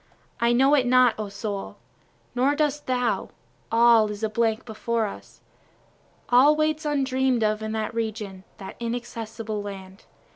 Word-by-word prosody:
I 235 0 +3
know 265 +4 +4
it 265 -4 +3
not 255 -1 +5
O 210 -1 -4
soul, 200 0 -5 0.6
Nor 265 +4 +2
dost 295 -1 -1
thou, 250 -1 0 0.4
all 230 -1 +5
is 210 +1 -7
a 220 - +1
blank 220 0 0
before 230 0 -2
us, 200 - -10 0.9
All 265 +5 +6
waits 310 0 0
undream'd 265 -4 +1
of 215 0 0
in 220 0 -4
that 220 +1 -3
region, 215 -4 -4
that 190 - -9
inaccessible 230 -2 -5
land. 195 -1 -9
230 Hz, 145 wpm, -25 LUFS, 215-255 Hz, 0.9 s, All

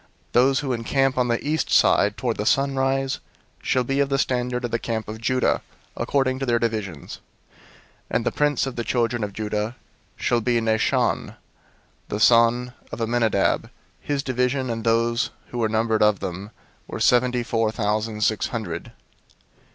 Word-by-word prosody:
002:003 - - -32 0.2
Those 130 +3 +4
who 135 -3 -2
encamp 135 +3 +1
on 125 -1 +1
the 120 +4 -1
east 155 +1 0
side - - +4
toward - - -1
the - - -2
sunrise 135 -1 +1 0.4
shall 130 - +1
be 135 +3 -1
of 140 -1 +2
the 135 - +1
standard 125 -2 -1
of 120 - -4
the 115 - 0
camp 110 -2 -3
of 110 +1 -7
Judah, 130 +1 +1 0.3
according 130 -2 0
to 135 - -2
their 120 -1 +3
divisions: 110 -9 -3 0.9
and - - 0
the - - +1
prince 145 -2 +1
of 135 - -5
the 120 - -1
children 120 -1 0
of 105 - -3
Judah 105 +2 -3 0.4
shall 120 -1 0
be 120 +1 +1
Nahshon 110 -1 0 0.7
the 105 - -3
son 120 +2 +4 0.2
of - - -6
Amminadab. 115 -3 +1
002:004 - - -16 0.3
His 145 -2 -2
division, 130 0 0
and 115 -1 -4
those 115 +1 +1 0.2
who 120 - -5
were 110 -2 +1
numbered 110 0 +1
of 105 -2 +4
them, 95 +3 -5 0.4
were - - -6
seventy 125 0 +3
four 115 -2 0
thousand 110 0 -1
six 110 -1 +1
hundred. 105 -9 -5
120 Hz, 170 wpm, -23 LUFS, 110-130 Hz, 0.9 s, Those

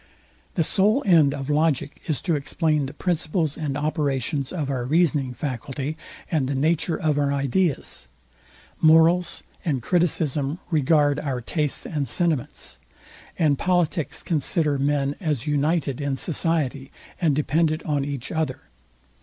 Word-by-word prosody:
The 165 - +2
sole 210 - +2
end 165 -7 +5
of 135 -1 -5
logic 150 -2 0
is 155 -4 -2
to 175 - +1
explain 150 0 0
the 140 - -8
principles 165 -3 -1
and 145 -3 -3
operations 145 -3 -1
of 155 -6 -2
our 130 -2 -2
reasoning 145 -1 +2
faculty, 135 +2 -4 0.4
and 150 -6 +1
the 140 - -1
nature 160 +4 +1
of 150 -2 +1
our 140 -1 +1
ideas: 140 +3 0 0.7
morals 165 +2 +4 0.2
and 150 -8 0
criticism 155 -4 +1
regard 145 -1 +3
our 135 -4 -2
tastes 150 +4 -2
and 145 -3 -2
sentiments: 155 +1 -1 0.6
and 145 -4 +2
politics 175 -4 0
consider 155 -2 +1
men 140 0 +1
as 150 -7 -1
united 150 -1 0
in 140 -1 -1
society, 150 -5 -1 0.3
and 155 -5 +3
dependent 155 +2 +1
on 145 -3 0
each 140 -3 -4
other. 155 -5 -2
150 Hz, 135 wpm, -24 LUFS, 140-165 Hz, 0.7 s, end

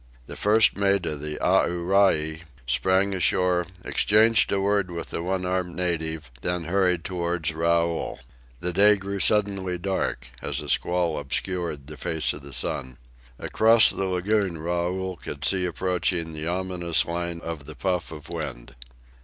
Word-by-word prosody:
The - - -8
first 110 +2 +4
mate 100 -2 +2
of 75 -2 -3
the 75 0 -4
Aorai 85 -3 +2 0.2
sprang 95 +10 +2
ashore, 90 -2 +1 0.2
exchanged 110 +2 +3
a 100 - +1
word 100 -1 +1
with 85 -1 -6
the - - -3
one 90 +1 -2
armed 90 -1 -2
native, 80 -5 -2
then 90 +3 -2
hurried 90 0 +1
toward 85 -3 -2
Raoul. 85 +1 0 0.4
The 90 0 -2
day 105 +3 +6
grew 100 0 -5
suddenly 95 -1 +2
dark, 90 -8 -2
as - - -2
a - - -7
squall 85 -3 +1
obscured 80 0 -2
the 75 +1 -10
face 80 -3 -1
of - - -9
the 70 0 -11
sun. 65 -1 -3 0.4
Across 110 0 +5
the 95 - -2
lagoon 95 0 0
Raoul 90 +3 -2
could 75 -1 -6
see 95 -2 +2
approaching 85 -1 -1
the 80 +1 -4
ominous 90 -2 0
line 85 0 -3
of 80 -4 -6
the 75 +1 -10
puff 90 -4 -2
of 75 -1 -9
wind. 80 -8 -6
90 Hz, 155 wpm, -25 LUFS, 80-95 Hz, 0.4 s, day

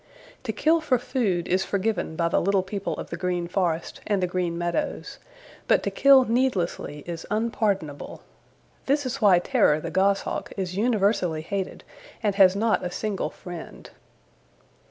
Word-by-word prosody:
To - - -1
kill 325 +1 +2
for 285 -5 +2
food 220 -8 -1
is 185 +1 +1
forgiven 200 -4 -1
by 170 +1 +1
the 170 - +1
little 195 0 +2
people 195 +1 -4
of - - -7
the 170 - -3
Green 175 -1 -2
Forest 170 -3 -2
and 205 -2 +1
the 185 - +1
Green 175 -1 -2
Meadows, 175 - -3 0.5
but - - +3
to - - -1
kill 275 -1 +6
needlessly 210 - -1
is 170 -1 -6
unpardonable. 205 -8 -2 0.6
This 285 +1 +2
is 255 +1 -3
why 200 -4 +6
Terror 155 -3 +2
the - - -5
Goshawk 195 +1 0
is 185 -2 -3
universally 200 -7 +1
hated 195 +2 -4 0.4
and 205 -2 +2
has 190 -1 +5
not 220 +2 +1
a 180 - -2
single 205 +2 -3
friend. 175 -2 -10
195 Hz, 155 wpm, -25 LUFS, 175-220 Hz, 0.6 s, kill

